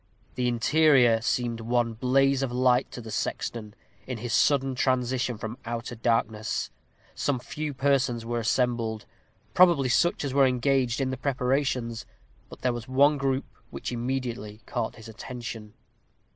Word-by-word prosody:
The 125 -1 -1
interior 125 -1 +4
seemed 120 0 -1
one 120 0 0
blaze 135 +3 +2
of 135 -3 -1
light 125 0 +2
to 125 - -8
the 110 -1 -9
sexton, 105 0 -4 0.3
in 125 -2 -4
his 115 +1 -4
sudden 135 -1 +3
transition 125 -2 0
from 110 +3 -6
outer 120 +1 -5
darkness. 115 -2 -1 0.4
Some 140 -2 -1
few 150 +4 -5
persons 130 -3 +1
were 120 0 -2
assembled, 115 -1 0 0.5
probably 170 -8 +5
such 170 +4 +2
as 135 - -3
were 135 -1 +5
engaged 130 -1 +1
in 130 -1 0
the 130 - -4
preparations; 125 -3 -1 0.4
but - - -12
there 125 -1 +2
was 120 -1 -6
one 140 +3 +4
group 135 -1 0 0.2
which 70 - -6
immediately 120 -4 -4
caught 120 -4 -3
his 115 -1 -12
attention. 115 -1 -8
125 Hz, 145 wpm, -27 LUFS, 115-135 Hz, 0.5 s, probably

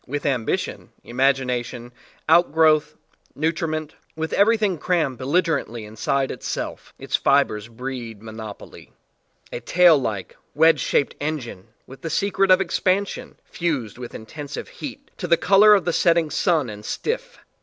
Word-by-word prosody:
With 145 +2 -4
ambition, 130 -6 -2
imagination, 125 -2 -1 0.3
outgrowth, 160 -2 +4 0.4
nutriment, 155 0 -2 0.2
with 160 0 -4
everything 210 -4 +3
crammed 155 -9 0
belligerent 160 +1 0
ly 120 -1 -6
inside 110 +6 -1
itself, - - -5
its - - -2
fibres 105 0 +2
breed 120 -2 -7
mon 110 0 -10
opoly 110 -2 -10 0.6
a - - -3
tail 170 +7 +5
like, 105 -6 -4 0.2
wedge 160 +2 +5
shaped 140 - +1
engine 145 -11 -4 0.2
with 135 - -13
the 165 - -4
secret 195 +3 +1
of 185 0 +7
expansion, 190 +2 -1
fused 140 - -3
with 120 -1 -8
intensive 145 +6 -7
heat 280 0 -9
to 180 - -4
the 170 0 +4
color 205 +4 +6
of 195 - 0
the 175 - 0
set 170 0 +4
ting 165 -3 0
sun 160 -3 +1
and 105 -1 -8
stiff. - - -4
155 Hz, 145 wpm, -22 LUFS, 120-175 Hz, 0.6 s, of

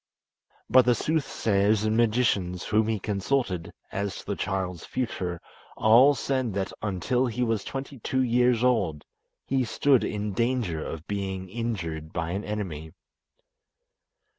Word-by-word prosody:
But 130 -2 +6
the 125 -1 +4
sooth 155 +4 0
sayers 105 0 +2
and 110 0 +1
magicians 105 -6 +1
whom 110 0 +2
he 110 -1 0
consulted 100 -2 -1 0.2
as 100 -2 -3
to - - -10
the - - -2
child's 95 -3 -3
future 90 -9 -3 0.4
all 125 +6 +6
said 130 -8 -1
that 95 -1 -2
until 105 +6 0
he 125 +1 -1
was 115 -4 0
twenty 135 0 -6
two 130 +4 0
years 125 -1 +3
old 95 -12 +1 0.4
he 135 -1 +1
stood 135 +2 +3
in 105 -1 -2
danger 115 -7 0
of 80 0 -6
being 95 -2 -3
injured 90 -9 -4
by 80 +1 -2
an 100 +3 -2
enemy. 85 -7 -5
105 Hz, 140 wpm, -27 LUFS, 95-125 Hz, 0.4 s, But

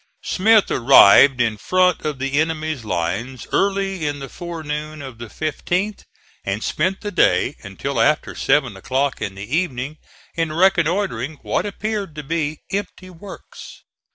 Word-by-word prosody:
Smith 215 +2 +3
arrived 130 +1 +7
in 115 -3 +1
front 185 - +2
of 150 -2 -2
the 135 +2 -1
enemy's 155 -4 -2
lines 105 +7 -3
early 195 -4 0
in 145 0 -2
the 135 -1 -7
forenoon 155 -2 -6
of 130 -5 -9
the 120 - -7
15th, 175 - -3 0.4
and 100 +2 -3
spent 185 +5 -1
the 205 - -4
day 90 - +2
until - - -3
after - - +1
seven 135 -6 +1
o'clock 130 +8 -1
in 100 -3 -4
the 100 +9 -4
evening 150 -4 -2 0.3
in 165 -2 -1
reconnoitering 170 - +1
what - - -1
appeared 205 -4 -4
to 150 - -6
be 155 0 -2
empty 190 -2 -5
works. 190 +3 -12
155 Hz, 145 wpm, -20 LUFS, 130-185 Hz, 0.4 s, arrived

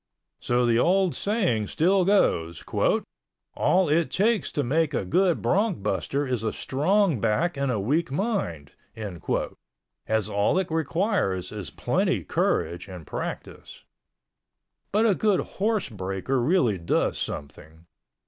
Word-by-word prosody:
So 120 0 +1
the 115 -1 +3
old 185 +3 +3
saying 185 - 0
still 180 - +2
goes... 85 - +1 0.9
"all 185 0 +2
it 160 +3 +2
takes 210 - +1
to 145 - 0
make 150 +3 +1
a 100 - -1
good 180 - +2
bronc 200 - +1
buster 135 - -1
is 125 -4 -2
a 110 -1 -1
strong 170 - +1
back 145 +12 +1
and 140 -1 -1
a 110 - -1
weak 145 +9 0
mind"... 135 - -2 1.4
as 110 -3 +1
all 100 - +1
it 190 -3 -1
requires 160 - 0
is 100 -7 -6
plenty - - 0
courage 85 +2 -1
and 90 -4 -9
practice. - - -7 1.1
But 215 +3 +3
a 215 - +4
good 205 0 +2 0.2
horse 215 -2 +1
breaker 95 +5 -2
really 125 - +2
does 85 - 0
something. 80 +3 -7
140 Hz, 130 wpm, -25 LUFS, -, 1.4 s, a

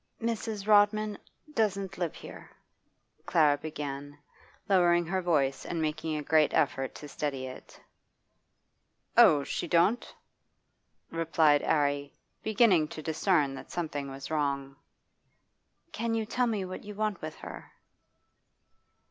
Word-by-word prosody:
'Mrs. 225 -3 -3
Rodman 210 0 +4 0.4
doesn't 195 -5 -1
live 170 -3 -2
here,' - - -11 0.8
Clara 150 -3 +4
began, 145 -2 -6 0.5
lowering 175 -3 +4
her 185 +3 -1
voice 140 -6 +1
and 170 - -4
making 155 0 -2
a 150 - -4
great 155 +1 +3
effort 135 -2 0
to 150 - -9
steady 140 -2 -3
it. 130 0 -11 1.4
'Oh, 145 -2 +7
she 170 - -3
don't?' 175 +8 +2 1.0
replied 160 -3 +3
'Arry, 145 -2 0 0.3
beginning 205 -7 +3
to 155 - -8
discern 155 -3 +1
that 135 - -9
something 145 -5 -4
was 135 +2 -8
wrong. 140 -3 -1 1.2
'Can 230 +1 -2
you 225 -1 -1
tell 245 +3 0
me 210 -5 -1
what 185 0 -7
you 210 0 -8
want 215 -2 -2
with 155 0 -6
her? - - -10
160 Hz, 120 wpm, -29 LUFS, 145-200 Hz, 1.4 s, Oh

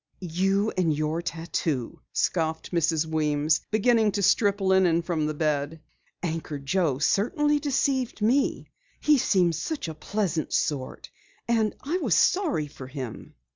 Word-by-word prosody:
"You 195 +4 +1
and 180 -3 +2
your 155 +2 -1
tattoo!" 160 -6 -3
scoffed 160 -2 -1
Mrs. 165 -2 +1
Weems, 155 -1 +1
beginning 220 -1 +3
to 200 - -1
strip 205 +1 +3
linen 190 -3 +3
from 165 -3 -1
the 155 - -3
bed. 150 0 -1 0.4
"Anchor 160 -3 -3
Joe 140 0 0
certainly 295 - +1
deceived 270 -4 0
me. 245 +6 +1 0.3
He 300 -2 +4
seemed 180 -7 +2
such 295 - -3
a 160 - -5
pleasant 175 -2 -2
sort 140 -4 -2 0.4
and 225 -2 +1
I 330 +7 -1
was 240 - +1
sorry 330 - +2
for 140 -3 -10
him." 130 -4 -8
170 Hz, 135 wpm, -26 LUFS, 155-215 Hz, 0.4 s, He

